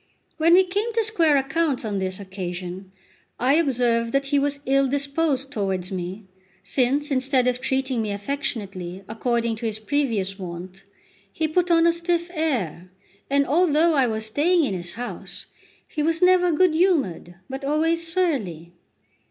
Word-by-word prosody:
When 330 +2 +5
we 380 - +6
came 405 +5 -2
to 455 0 +2
square 335 -9 +3
accounts 285 -1 0
on 205 -2 -2
this 185 0 -3
occasion, 185 -1 -6 0.5
I 260 +3 +3
observed 245 -7 +1
that 275 0 +1
he 285 +1 +2
was 285 0 -1
ill 275 +1 +3
disposed 280 0 0
towards 190 -6 -2
me, 185 +3 -5 0.4
since, 280 +3 +1
instead 260 -1 +2
of 250 0 0
treating 265 -2 0
me 215 - -2
affectionately, 200 - -4
according 230 0 -1
to 230 +1 -3
his 215 -1 -1
previous 220 -6 -1
wont, 185 +1 -8 0.5
he 315 +7 -1
put 360 +3 +1
on 335 -1 +4
a 335 - +4
stiff 340 0 -1
air; 225 - -2 0.4
and 280 0 +3
although 325 +2 +3
I 270 -4 +3
was 220 -1 -1
staying 320 +10 +2
in 205 - -2
his 175 -1 -2
house, 245 +2 -4 0.4
he 305 - -4
was 325 +2 +1
never 360 -1 +4
good 335 +1 +3
humoured, 290 - +1
but 265 +1 -6
always 325 +3 0
surly. 210 - -1
270 Hz, 160 wpm, -23 LUFS, 205-320 Hz, 0.5 s, we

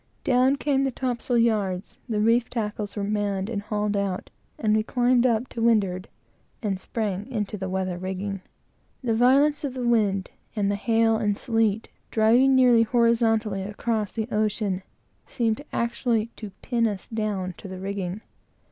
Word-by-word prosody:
Down 255 +2 +3
came 275 -1 +1
the 270 - +1
topsail 245 -1 -1
yards, 210 -5 0
the 215 -2 0
reef 230 +2 +3
tackles 210 -3 -3
were 205 - -2
manned 205 0 -1
and 205 -3 -2
hauled 210 0 -1
out, 195 -2 -2 0.3
and 215 -1 +2
we 215 - +3
climbed 245 +2 +2
up 235 +1 +1
to 230 - -5
windward, 205 -5 +2 0.6
and 195 -3 -1
sprang 205 -1 -3
into 210 -3 -2
the 190 -2 -4
weather 185 -1 -2
rigging. 190 +1 -4 0.6
The 235 -3 +1
violence 275 +6 +4
of 270 -3 -3
the 250 -2 -2
wind, 205 -5 +1 0.2
and 200 -2 +1
the - - 0
hail 225 +1 +2
and 210 -2 0
sleet, 225 -2 0 0.2
driving 240 +5 +4
nearly 250 -3 +6
horizontally 225 -3 +2
across 210 +1 -2
the 220 -1 -3
ocean, 210 -3 0 0.5
seemed 225 0 -1
actually 235 -1 0
to 215 - -7
pin 235 -2 +1
us 200 -3 -5
down 210 -5 -2
to - - -9
the 185 -1 -7
rigging. 195 0 -4
220 Hz, 160 wpm, -25 LUFS, 200-235 Hz, 0.6 s, nearly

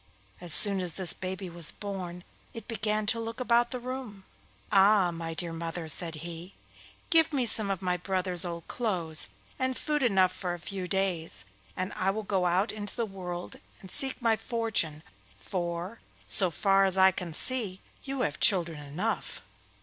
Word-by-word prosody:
As 175 -2 -3
soon 200 +2 +9
as 180 -3 -1
this 185 -3 +1
baby 190 +1 -5
was 170 -2 0
born 185 -4 -6 0.3
it 230 - -8
began 215 -1 -1
to 230 +2 +1
look 230 +1 -5
about 240 -1 +3
the 250 - -4
room. 245 -5 -7 0.5
'Ah, 195 -2 +5
my 165 -1 -5
dear 170 0 -4
mother!' 165 0 -5
said 165 +1 +3
he, 170 +2 -8 0.6
'give 325 -1 +6
me 270 -4 +2
some 215 -2 +2
of 195 -1 -2
my 180 -1 +1
brothers' 185 -1 0
old 170 -2 -6
clothes, 175 -9 -1 0.3
and 260 0 -1
food 300 -1 -1
enough 190 -7 +3
for 180 -2 -3
a - - -11
few 185 +1 -5
days, 185 - -1 0.3
and 185 +2 -3
I 190 - 0
will 215 +3 -2
go 190 -3 0
out 185 +5 +1
into 205 -1 -4
the 235 - -1
world 180 -3 -7 0.2
and 190 - -12
seek 265 -1 -2
my 230 -3 +2
fortune, 220 -9 -1 0.3
for, 175 - -4 0.3
so 190 -3 +4
far 195 +4 +3
as 190 0 +3
I 190 0 +7
can 180 -2 -6
see, 205 +1 -1 0.2
you 270 -1 -3
have 145 - -1
children 170 -5 +3
enough. 160 +10 -4
190 Hz, 175 wpm, -29 LUFS, 175-220 Hz, 0.6 s, soon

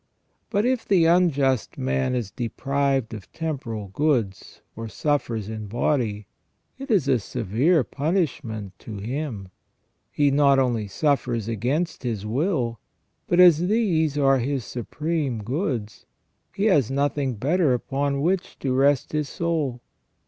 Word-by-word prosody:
But 205 0 +1
if 255 -2 +1
the 180 -5 +3
unjust 145 -8 +2
man 65 - 0
is 115 -6 -3
deprived 135 0 -1
of 105 -4 -9
temporal 130 -11 -4
goods, 115 -5 -1
or 115 0 -6
suffers 115 -5 -1
in 110 -1 -6
body, 115 -2 -1 0.5
it 275 +1 -7
is 190 - +2
a 130 -3 +3
severe 125 - +1
punishment 130 - -2
to 110 -3 -8
him; 115 -2 -4 0.6
he 145 -1 +2
not 140 -1 +4
only 120 -5 +1
suffers 125 -2 0
against 130 - -1
his 115 -5 -3
will, 120 - -1 0.5
but 175 - +2
as 175 -1 +7
these 170 -9 +1
are 135 -2 +4
his 130 -1 -2
supreme 140 -1 -3
goods, 125 - -3 0.5
he 200 - 0
has 150 - +3
nothing 140 -1 0
better 150 - +2
upon 140 +2 -1
which 180 +4 -1
to 130 -2 -1
rest 135 +1 +2
his 150 -2 -1
soul. 155 -8 -2
135 Hz, 135 wpm, -24 LUFS, 115-155 Hz, 0.6 s, as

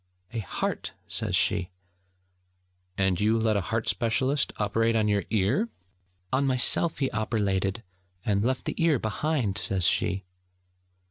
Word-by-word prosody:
'A 115 - -2
heart!' 100 - -3
says - - -1
she. 90 - +1 1.3
'And 95 -2 +1
you 110 +2 +3
let 110 -1 +1
a 100 - +2
heart 115 +5 -2
specialist 130 +4 +1
operate 115 +2 +1
on 110 -1 +2
your 100 -1 +1
ear?' 115 - +1 0.6
'On 130 +2 +3
myself 130 +5 +3
he 135 -2 0
operlated, 105 -1 -1 0.4
and 100 -1 +1
left 130 +2 -1
the - - -2
ear 160 -4 +4
behind!' 110 -2 -1
says 95 -2 0
she. 95 +1 +1
110 Hz, 135 wpm, -27 LUFS, 100-130 Hz, 1.3 s, ear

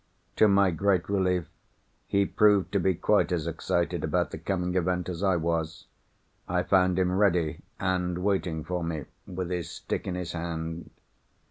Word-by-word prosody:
To 110 - +6
my 100 -2 +4
great 90 +1 +1
relief 90 -4 +1 0.6
he 100 0 +2
proved 105 -1 +3
to 100 - +2
be 95 0 +2
quite 90 - +2
as 85 -3 0
excited 85 - -1
about - - 0
the - - -6
coming 90 -2 -2
event 90 -1 0
as 90 -1 -5
I 95 -2 +3
was. 85 0 -2 0.6
I 90 0 0
found 90 -1 +3
him 90 -1 +2
ready, 90 -4 +2 0.2
and 90 -2 0
waiting 95 -5 0
for 90 +1 -3
me, 80 -4 -3 0.2
with 90 -1 -4
his 85 -2 -2
stick - - -4
in 90 - -2
his 90 -2 -4
hand. 80 0 -4
90 Hz, 165 wpm, -27 LUFS, 85-95 Hz, 0.6 s, To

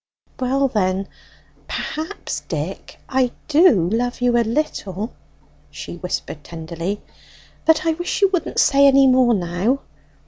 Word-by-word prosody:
"Well 270 +2 +1
then, 195 -4 0 0.6
perhaps, 320 +6 -4
Dick, - - -6
I 260 -2 +1 0.2
do 290 - +5
love 245 +5 -1
you 245 -1 +2
a 240 - +4
little," 225 - -2 0.6
she 175 - -8
whispered 170 -4 -5
tenderly; 170 +5 -5 0.6
"but 320 +1 +4
I 325 - +3
wish 350 +5 -2
you 395 - +6
wouldn't 365 -3 -2
say 280 0 +5
any 275 0 +6
more 255 -2 +5
now." 185 +9 0
245 Hz, 130 wpm, -21 LUFS, 190-280 Hz, 0.6 s, you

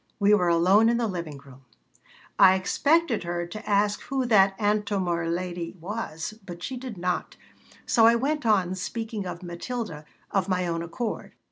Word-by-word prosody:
We 205 0 +4
were 180 -4 +3
alone 185 +6 +4
in 235 - +2
the 235 - 0
living 170 -8 -4
room 135 -1 -16 0.8
I 190 -1 +8
expected 280 - +1
her 175 0 -3
to 215 +6 -8
ask 205 0 +2
who 270 -2 -2
that 195 -4 +4
Antomir 200 -5 0
lady 175 0 -4
was, 185 -1 -5
but 175 -2 -9
she 265 - -4
did 250 -4 -7
not, 180 0 -2 0.5
so 225 -2 +5
I 230 - +6
went 290 +5 -1
on 195 -5 +2
speaking 215 +1 -4
of 180 0 -7
Matilda 175 -2 -5 0.3
of 195 -1 0
my 185 -1 +1
own 165 -1 -2
accord. 190 +7 -5
195 Hz, 165 wpm, -26 LUFS, 175-225 Hz, 0.8 s, I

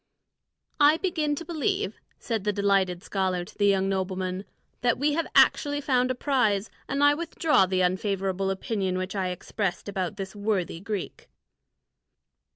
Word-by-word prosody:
"I 295 +2 +6
begin 320 -5 0
to 335 - -7
believe," 380 +5 -1 0.2
said 225 -4 -3
the 210 - +1
delighted 195 -3 +1
scholar 185 -2 -1
to - - -15
the 205 - +2
young 195 -1 +3
nobleman, 190 0 -2 0.4
"that 240 -1 +2
we 290 +2 +1
have 330 +2 0
actually 290 -1 +4
found 255 -3 +1
a 255 - 0
prize, 225 -7 +1 0.2
and 280 +1 +1
I 290 0 +7
withdraw 315 - +2
the 185 0 +1
unfavourable 190 +1 0
opinion 195 -1 -1
which 185 +2 -4
I 190 -2 0
expressed 180 +1 -3
about 195 0 -3
this 195 0 -6
worthy 200 -5 -1
Greek." 200 0 -5
200 Hz, 155 wpm, -26 LUFS, 190-280 Hz, 0.4 s, I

